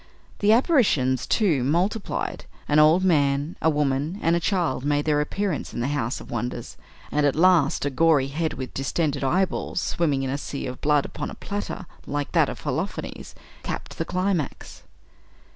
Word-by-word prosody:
The 205 +1 +4
apparitions, 215 - +3
too, 170 - +2
multiplied. 180 - -1 0.2
An 150 - +4
old 155 +4 +5
man, 145 -3 +2
a 160 - +4
woman, 145 +3 0
and 165 +1 +3
a - - +2
child 170 -8 0
made 145 0 +1
their 150 -1 +2
appearance 190 +2 -3
in - - -3
the 125 +3 -1
house 135 -4 -1
of - - -12
wonders, 120 0 -4 0.4
and, 150 - +1
at 145 -2 +2
last, 165 -4 +4
a 145 - 0
gory 145 -2 +3
head 155 +2 -2
with 130 -1 -6
distended 140 +1 -1
eyeballs, 180 +6 0
swimming 150 -6 0
in 130 - -2
a 140 - -2
sea 140 0 -5
of 125 -1 -6
blood, 150 -1 +3
upon - - -5
a - - -8
platter 205 -2 -5 0.2
like 145 0 -3
that 165 -4 +3
of - - -7
Holofernes 155 +7 -4 0.3
capped - - -6
the - - 0
climax. 185 -5 -2
150 Hz, 175 wpm, -24 LUFS, 140-175 Hz, 0.4 s, old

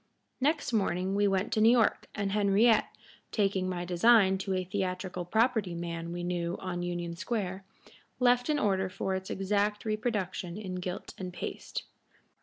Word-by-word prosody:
Next 290 -1 +1
morning 190 -3 +1
we 205 0 +3
went 195 +3 0
to 215 - +2
New 220 - +7
York, 235 -2 +3
and 200 -2 -1
Henriette, 210 +3 +4 0.4
taking 195 -3 +1
my 175 -1 -3
design 190 +2 +5
to 190 0 -1
a 185 - 0
theatrical 185 -1 -3
property 220 -2 +1
man 170 0 -4
we 175 0 -4
knew 175 0 -2
on 180 -1 -4
Union 175 -1 -3
Square, 195 -1 -3 0.5
left 245 +1 +3
an 300 - +3
order 190 -6 +1
for 190 +1 -2
its 190 0 -4
exact 205 +2 0
reproduction 205 -5 -2
in 195 -4 -5
gilt 180 +1 -5
and 185 -1 -4
paste. 175 - -5
190 Hz, 160 wpm, -30 LUFS, 180-215 Hz, 0.5 s, New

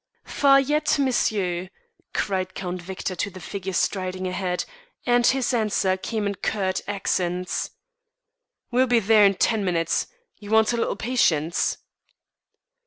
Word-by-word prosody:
"Far 275 -1 +4
yet, 295 +3 +1
monsieur?" 200 -9 0 0.4
cried 190 -2 -2
Count 180 -1 -4
Victor 185 +1 -5
to 205 - -1
the 185 -1 -11
figure 190 +2 -5
striding 185 0 -1
ahead, 180 -1 -2 0.4
and 245 -1 +4
his 260 -1 +2
answer 210 -5 +1
came 215 +2 -3
in 200 - 0
curt 190 -1 -1
accents. 180 -2 -1 1.0
"We'll 255 +2 +3
be 240 -1 +4
there 215 0 +5
in 195 - +1
ten 220 +1 +1
minutes. 170 -3 0 0.3
You 205 - -11
want 220 +1 +4
a - - 0
little 230 - 0
patience." 170 -10 +1
200 Hz, 135 wpm, -24 LUFS, 185-235 Hz, 1.0 s, there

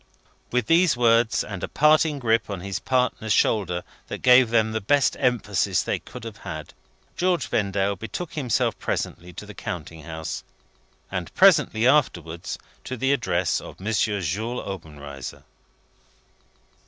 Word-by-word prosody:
With 125 0 +1
these 165 -3 +4
words, 115 -1 +3
and 100 -3 -7
a - - -1
parting 150 0 +3
grip 115 -4 +1
of 100 -2 -4
his 100 0 -3
partner's 125 -4 0
shoulder 90 -5 +1 0.2
that - - -6
gave 125 -1 +7
them 110 -1 +2
the 110 0 -2
best 140 +6 +3
emphasis 105 -6 +1
they - - -1
could - - -11
have - - -7
had, - - -7 0.4
George 175 -5 +1
Vendale 100 -1 0
betook 115 - -6
himself 125 -8 0
presently 90 +1 -3
to 105 - -8
the 105 - -10
counting 85 -3 -6
house, 80 0 -6 0.7
and - - -4
presently 110 +2 +5
afterwards 85 - +1 0.3
to 130 - -5
the 135 +4 +2
address 90 -10 0
of - - -11
M. 105 +4 -2
Jules 105 +3 -1
Obenreizer. 75 -8 -8
110 Hz, 140 wpm, -24 LUFS, 90-125 Hz, 0.7 s, gave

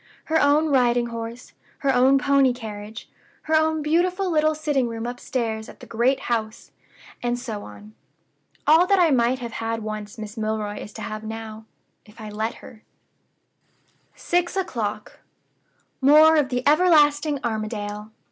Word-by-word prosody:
Her 320 0 +1
own 295 +2 +3
riding 245 -3 +3
horse; 230 +2 -7 0.2
her 275 -1 +1
own 260 +2 +5
pony 275 -1 +3
carriage; 215 -2 -8 0.4
her 315 - -3
own 315 0 +2
beautiful 360 +4 +1
little 310 -1 +2
sitting 295 -5 0
room 230 0 -5
upstairs 235 -2 -4
at - - -14
the - - -11
great 245 +4 +1
house, 225 -1 -3 0.5
and 240 0 -1
so 230 -4 -6
on. 210 +1 -12 0.7
All 325 +4 +5
that 395 - +4
I 345 -4 +4
might 245 0 +2
have 240 -2 -7
had 225 0 -4
once 215 +1 -6
Miss 215 +1 -8
Milroy 215 -1 -3
is 210 - -9
to 220 - -8
have 215 +1 -6
now 220 0 -7 0.4
if 210 +2 -19
I 215 -1 -8
let 220 +2 -3
her." 225 -4 -14 1.3
"Six 350 +1 -1
o'clock. 220 - -4 0.8
More 305 +4 +7
of 295 -4 +2
the 250 +1 -2
everlasting 295 -2 +4
Armadale! 215 -2 -4
245 Hz, 150 wpm, -23 LUFS, 220-295 Hz, 1.3 s, More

